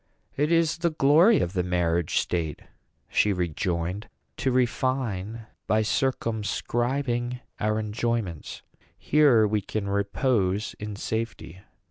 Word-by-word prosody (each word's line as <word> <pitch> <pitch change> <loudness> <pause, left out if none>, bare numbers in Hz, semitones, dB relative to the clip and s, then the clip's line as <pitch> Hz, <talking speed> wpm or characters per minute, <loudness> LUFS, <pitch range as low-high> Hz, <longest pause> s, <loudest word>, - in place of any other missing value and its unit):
"It 150 +3 +1
is 165 -1 +2
the 170 0 +2
glory 160 +8 +5
of 85 - -2
the 90 - +1
marriage 85 -2 0
state," 80 -4 -1 0.4
she 105 - +2
rejoined, 90 +2 -2 0.3
"to 130 - 0
refine 120 -4 -1 0.2
by 110 0 +3
circumscribing 120 +1 -1 0.2
our 110 0 +1
enjoyments. 110 -5 -3 0.3
Here 140 -7 +4
we 105 0 0
can 100 +1 -4
repose 100 0 0
in 105 0 -5
safety. 110 -5 -4
110 Hz, 110 wpm, -26 LUFS, 95-130 Hz, 0.4 s, glory